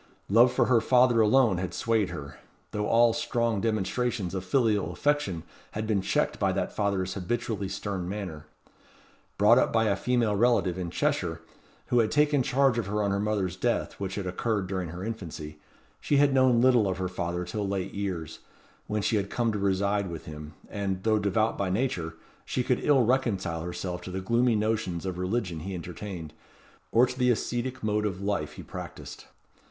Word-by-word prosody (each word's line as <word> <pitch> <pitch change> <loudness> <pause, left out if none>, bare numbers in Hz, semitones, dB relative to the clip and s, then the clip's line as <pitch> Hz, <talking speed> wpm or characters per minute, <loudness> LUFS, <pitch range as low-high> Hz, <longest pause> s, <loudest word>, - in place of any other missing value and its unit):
Love 120 +5 +6
for - - +2
her 120 -3 +4
father 125 0 +4
alone 110 -3 +4
had 95 -1 -4
swayed 110 -4 +1
her; 70 -1 -8 0.3
though 105 0 -2
all 115 0 +5
strong 115 -4 0
demonstrations 110 -1 -1
of 95 -1 -3
filial 105 -4 +1
affection 145 - 0 0.3
had 110 +1 -3
been 105 -3 +1
checked - - 0
by - - +2
that - - -2
father's 95 -3 0
habitually 100 +1 -2
stern 95 -2 -4
manner. 90 -7 -6 0.9
Brought - - +6
up - - +2
by 115 0 +3
a 100 -2 +2
female 120 -4 +1
relative 110 -5 +2
in 90 -2 -4
Cheshire, 80 0 -1 0.5
who 120 - +3
had 110 -2 +3
taken 145 +1 +3
charge 130 -1 +2
of 115 - -3
her 105 +1 0
on 100 - +1
her 100 - 0
mother's 100 -3 -1
death, 120 +5 -1
which 95 -1 -3
had 100 - -3
occurred 100 +2 -1
during 95 -2 -3
her 90 +3 -7
infancy, 80 -8 -6 0.4
she 145 - +1
had 140 -1 +4
known 130 -3 +4
little 125 -5 +5
of 95 -2 -1
her 95 0 -1
father 90 -1 -3
till 100 +3 -3
late 95 -1 -3
years, 95 -6 -4 0.5
when 105 -1 -1
she 110 - +2
had 100 -1 -2
come 115 0 0
to 105 - -3
reside 100 0 +1
with 85 -2 -7
him, 75 0 -9
and, 95 -2 -3
though 110 -1 +3
devout 105 +2 +1
by 100 -2 0
nature, 90 -7 -1 0.3
she 125 - -1
could 125 -1 0
ill 140 -4 +4
reconcile 110 -9 0
herself 90 +1 -4
to 90 - -8
the 95 +1 -3
gloomy 115 +5 +2
notions 105 -5 -1
of 90 -1 -3
religion 90 -3 -1
he 95 +4 -5
entertained, 85 -2 -7 0.6
or 120 +2 +6
to 125 +1 -7
the 125 0 +3
ascetic 120 +2 -1
mode 105 0 +1
of 95 -2 -4
life 100 -7 -2
he - - -9
practised. - - -9
100 Hz, 190 wpm, -28 LUFS, 90-115 Hz, 0.9 s, Love